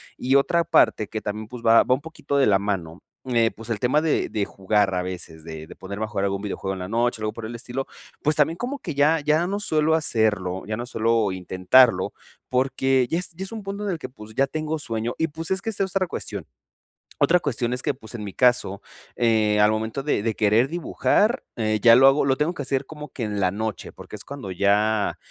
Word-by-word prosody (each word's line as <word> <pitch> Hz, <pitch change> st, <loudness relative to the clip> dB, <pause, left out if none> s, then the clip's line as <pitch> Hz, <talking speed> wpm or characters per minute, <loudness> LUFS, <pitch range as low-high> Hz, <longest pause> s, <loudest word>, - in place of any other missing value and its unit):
Y 130 Hz, +2 st, 0 dB
otra 170 Hz, +5 st, +3 dB
parte 160 Hz, -9 st, +3 dB
que 110 Hz, -, -3 dB
también, 105 Hz, +1 st, -5 dB
pues, 125 Hz, -1 st, -8 dB
va 115 Hz, 0 st, +7 dB
va -, -, +2 dB
un 130 Hz, -, 0 dB
poquito 160 Hz, -2 st, -4 dB
de 140 Hz, -, +4 dB
la 100 Hz, -2 st, +5 dB
mano, 95 Hz, -4 st, -4 dB, 0.2 s
eh, 115 Hz, -2 st, +3 dB
pues 115 Hz, +1 st, -11 dB
el 105 Hz, -, -1 dB
tema 130 Hz, +5 st, +2 dB
de 160 Hz, -1 st, 0 dB
de 105 Hz, -2 st, -1 dB
jugar 100 Hz, 0 st, 0 dB
a 90 Hz, -, 0 dB
veces. 85 Hz, -3 st, -7 dB
De 80 Hz, -1 st, -8 dB
de -, -, -12 dB
poner 100 Hz, +2 st, -7 dB
mejor 105 Hz, -2 st, -2 dB
algún 100 Hz, 0 st, -1 dB
videojuego 95 Hz, -1 st, -3 dB
en 95 Hz, -, -6 dB
la 90 Hz, -, -5 dB
noche, 115 Hz, +2 st, 0 dB
algo 105 Hz, 0 st, -2 dB
por 115 Hz, 0 st, -7 dB
el 120 Hz, -, -7 dB
estilo, 125 Hz, +3 st, -5 dB, 0.3 s
pues 150 Hz, +1 st, +1 dB
también 155 Hz, +2 st, +2 dB
como 255 Hz, +6 st, -3 dB
que 165 Hz, -, -5 dB
ya 150 Hz, +3 st, +4 dB
ya 155 Hz, +4 st, +2 dB
no 200 Hz, +2 st, -2 dB
suelo 160 Hz, -5 st, +2 dB
hacerlo. 105 Hz, -, 0 dB
Ya 110 Hz, 0 st, -3 dB
no 120 Hz, -, -4 dB
suelo 115 Hz, -3 st, +1 dB
intentarlo, 95 Hz, +7 st, +3 dB, 0.4 s
porque 130 Hz, 0 st, +1 dB
ya 165 Hz, -, 0 dB
es 180 Hz, -, -2 dB
ya 175 Hz, +3 st, -7 dB
es 195 Hz, -, -10 dB
un 220 Hz, -2 st, -6 dB
punto 200 Hz, +1 st, -5 dB
en 205 Hz, -, -2 dB
el 175 Hz, -, -2 dB
que, 130 Hz, -, -7 dB
pues, 110 Hz, -3 st, -13 dB
ya 135 Hz, -, +3 dB
tengo 155 Hz, +2 st, -3 dB
sueño. 115 Hz, -4 st, -3 dB
Y 160 Hz, -, +1 dB
pues 160 Hz, +2 st, -7 dB
es 190 Hz, -, +1 dB
que 225 Hz, -, -2 dB
esa 200 Hz, -, +1 dB
es 190 Hz, -, -9 dB
otra 190 Hz, -1 st, +2 dB
cuestión. -, -, -6 dB, 0.7 s
Otra 180 Hz, +1 st, +4 dB
cuestión 120 Hz, -6 st, -2 dB
es 125 Hz, -, -3 dB
que, -, -, -1 dB
pues, 110 Hz, -5 st, -13 dB
en 115 Hz, -3 st, -6 dB
mi 100 Hz, -, -6 dB
caso, 120 Hz, -5 st, +2 dB, 0.4 s
eh, 110 Hz, -3 st, +2 dB
al 105 Hz, +1 st, +5 dB
momento 110 Hz, +5 st, -3 dB
de 145 Hz, -7 st, 0 dB
de 110 Hz, 0 st, -1 dB
querer 110 Hz, +4 st, +3 dB
dibujar 205 Hz, -, +1 dB, 0.2 s
eh, 110 Hz, -1 st, +1 dB
ya 115 Hz, -1 st, +8 dB
lo 130 Hz, +2 st, +6 dB
hago 135 Hz, +2 st, +4 dB
lo 135 Hz, -1 st, +3 dB
tengo 150 Hz, +4 st, 0 dB
que 160 Hz, -, -6 dB
hacer 135 Hz, -1 st, -1 dB
como 150 Hz, -1 st, -9 dB
que 125 Hz, -, -6 dB
en 105 Hz, -2 st, -2 dB
la 95 Hz, -2 st, +2 dB
noche, 105 Hz, +1 st, -4 dB
porque -, -, -11 dB
es -, -, -10 dB
cuando 140 Hz, -9 st, -7 dB
ya 100 Hz, +3 st, +1 dB
120 Hz, 240 wpm, -24 LUFS, 105-150 Hz, 0.7 s, ya